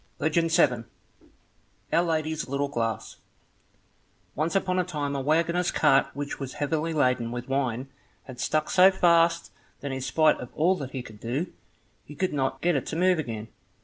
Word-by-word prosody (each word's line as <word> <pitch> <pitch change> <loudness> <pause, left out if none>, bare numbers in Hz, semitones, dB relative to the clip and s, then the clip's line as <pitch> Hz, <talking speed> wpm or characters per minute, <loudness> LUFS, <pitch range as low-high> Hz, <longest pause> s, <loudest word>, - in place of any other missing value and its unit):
Legend 165 +2 +1
7 125 -7 +3 1.1
Our 170 - +5
Lady's 160 -3 -1
Little 140 +1 -1
Glass 115 -5 -3 1.2
Once 160 +5 -1
upon 185 -1 +1
a - - +2
time 145 -5 -3
a 135 - -1
waggoner's 170 +5 +1
cart 135 -3 +3
which 145 0 -5
was 135 -2 -5
heavily 155 +2 -1
laden 125 -6 +1
with 120 0 -5
wine 135 -2 -1 0.4
had 130 -2 -11
stuck 155 0 0
so 185 +1 +7
fast 170 -2 +3 0.3
that 140 - -4
in 130 0 -4
spite 155 +4 +3
of 125 - -7
all 175 +5 +3
that 140 -5 -5
he 130 -2 -5
could 110 -3 -13
do, 130 - -3 0.5
he 150 - -12
could 185 +2 -1
not 135 -1 -1
get 175 -1 +2
it 135 - -2
to - - -4
move 180 0 +3
again. 115 -6 -5
150 Hz, 175 wpm, -26 LUFS, 130-165 Hz, 1.2 s, so